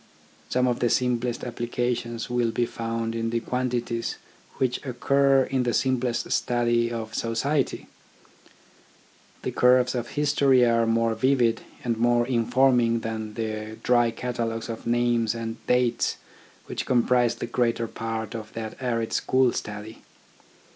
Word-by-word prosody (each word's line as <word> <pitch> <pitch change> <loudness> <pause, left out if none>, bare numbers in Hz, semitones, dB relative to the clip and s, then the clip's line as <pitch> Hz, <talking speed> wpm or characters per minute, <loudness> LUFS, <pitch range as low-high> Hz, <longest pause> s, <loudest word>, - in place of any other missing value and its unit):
Some 125 0 +2
of 125 -1 0
the 120 - +2
simplest 125 -1 0
applications 120 -1 -2
will 120 -1 +1
be 120 +1 0
found 115 0 -3
in 115 0 -2
the 115 0 0
quantities 120 -1 -2 0.4
which 130 -2 0
occur 135 +1 +3
in 130 0 -1
the 120 -1 0
simplest 130 -2 0
study 120 -1 +1
of 110 -2 -5
society. 130 +5 -1 1.6
The - - -2
curves 125 0 +4
of 120 -2 -3
history 140 -3 +3
are 115 -1 +2
more 115 0 +2
vivid 120 -1 +2 0.2
and 115 -2 -1
more 120 0 +3
informing 120 -1 +2
than 110 -1 -5
the 110 -1 -4
dry 120 -1 +4
catalogues 115 -1 -3
of 115 0 -6
names 120 -1 +1
and 115 0 -4
dates 125 -1 +1 0.5
which - - -5
comprise 125 -1 +3
the - - -4
greater 120 -1 0
part 110 -1 -4
of 110 -1 -7
that 110 +2 -6
arid 115 -3 -1
school 130 -2 +2
study. 105 +1 -6
120 Hz, 135 wpm, -25 LUFS, 115-125 Hz, 1.6 s, curves